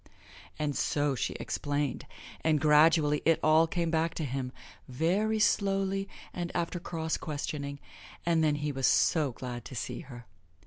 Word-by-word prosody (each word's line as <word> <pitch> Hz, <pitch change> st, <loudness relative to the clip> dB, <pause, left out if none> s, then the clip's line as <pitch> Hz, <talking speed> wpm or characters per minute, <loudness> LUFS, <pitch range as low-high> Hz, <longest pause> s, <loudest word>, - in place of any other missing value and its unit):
And 150 Hz, -2 st, -1 dB
so 145 Hz, +1 st, +1 dB
she 120 Hz, -, -2 dB
explained, 145 Hz, -1 st, -2 dB, 0.4 s
and 155 Hz, -2 st, +3 dB
gradually 150 Hz, 0 st, +4 dB
it 165 Hz, 0 st, +3 dB
all 155 Hz, +1 st, +5 dB
came 170 Hz, -1 st, -1 dB
back 165 Hz, 0 st, 0 dB
to 160 Hz, -, -2 dB
him 130 Hz, -1 st, -3 dB, 0.4 s
very 185 Hz, -, +1 dB
slowly 195 Hz, -2 st, +1 dB, 0.2 s
and 175 Hz, -1 st, -4 dB
after 170 Hz, +1 st, -1 dB
cross 160 Hz, -2 st, -3 dB
questioning 145 Hz, -1 st, -4 dB, 0.5 s
and 165 Hz, -1 st, +3 dB
then 150 Hz, -1 st, +3 dB
he 145 Hz, 0 st, -2 dB
was 135 Hz, -2 st, +1 dB
so 150 Hz, -5 st, +3 dB
glad 120 Hz, -1 st, -6 dB
to 130 Hz, -, -8 dB
see -, -, -4 dB
her. 125 Hz, -6 st, -10 dB
155 Hz, 150 wpm, -30 LUFS, 140-170 Hz, 0.5 s, all